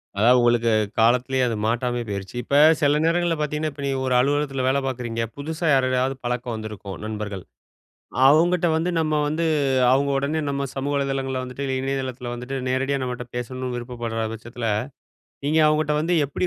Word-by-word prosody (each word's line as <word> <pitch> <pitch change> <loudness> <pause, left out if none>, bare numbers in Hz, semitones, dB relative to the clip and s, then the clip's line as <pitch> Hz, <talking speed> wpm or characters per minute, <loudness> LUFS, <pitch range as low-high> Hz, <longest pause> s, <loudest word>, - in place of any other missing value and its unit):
அதாவது 120 +5 +5
உங்களுக்கு 120 -1 +3 0.3
காலத்திலேயே 125 +3 +3
அது 115 - -1
மாட்டாமயே 120 +1 -1
போயிருச்சு. 100 +1 -5
இப்ப 140 - -1 0.3
சில 145 0 +3
நேரங்கள்ல 170 0 +2
பார்த்தீங்கன்னா, 150 +1 -1
இப்ப 140 - -8
நீங்க 135 -1 -1
ஒரு 130 - +1
அலுவலகத்தில 140 0 0
வேல 135 +1 +2
பார்க்குறீங்க. 120 -3 -3
புதுசா 160 +4 -4
யாரோடயாவது 130 0 +2
பழக்கம் 120 -1 -2
வந்திருக்கும், 105 -3 -7
நண்பர்கள். 105 -3 -5 0.8
அவங்கட்ட 170 +5 +4
வந்து 165 +3 0
நம்ம 155 -1 +1
வந்து 160 +3 -1 0.5
அவுங்க 140 +2 +2
உடனே 145 +3 -1
நம்ம 140 0 -1
சமூக 140 +1 -2
வலைதளங்கள்ல 135 -2 -1
வந்துட்டு 130 +2 -6
இல்ல 135 -1 -1
இணையதளத்தில 130 -2 -3
வந்துட்டு 125 +3 -5
நேரடியா 135 +2 0
நம்மட்ட 125 -1 -4
பேசணும்னு 125 +1 -4
விருப்பப்பட்ற 120 -2 -4
பட்சத்தில, 115 +1 -6 0.8
நீங்க 155 +3 +2
அவுங்கட்ட 150 0 +2
வந்து 165 +3 0
எப்படி 145 +6 -2
130 Hz, 155 wpm, -23 LUFS, 120-145 Hz, 0.8 s, அதாவது